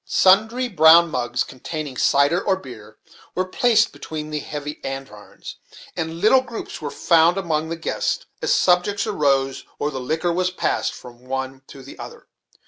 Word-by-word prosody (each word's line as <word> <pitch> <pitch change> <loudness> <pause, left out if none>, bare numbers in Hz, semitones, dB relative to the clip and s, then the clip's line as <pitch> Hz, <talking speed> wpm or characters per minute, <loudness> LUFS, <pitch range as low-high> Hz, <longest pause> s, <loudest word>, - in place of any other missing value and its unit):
Sundry 220 +9 +3
brown 170 -4 +6
mugs, 120 -2 -1
containing 145 +1 -7
cider 140 +8 +2
or 190 - +2
beer, 115 - -12 0.4
were 185 - 0
placed 220 +3 +2
between 155 -1 -7
the 150 - -2
heavy 150 0 -7
andirons, 135 -7 -8 0.4
and 165 -1 -4
little 220 +7 +5
groups 235 -8 -8
were 150 - -4
found 170 +4 +3
among 160 -4 -1
the 165 - -3
guests 165 - -2 0.2
as - - 0
subjects 185 +3 +2
arose 135 -9 0
or 145 - -2
the 135 - -5
liquor 160 +7 -1
was 185 +1 0
passed 185 - -1
from 120 0 -14
one 130 0 -4
to 135 -2 -12
the 135 - -12
other. - - -10
160 Hz, 160 wpm, -22 LUFS, 135-185 Hz, 0.4 s, brown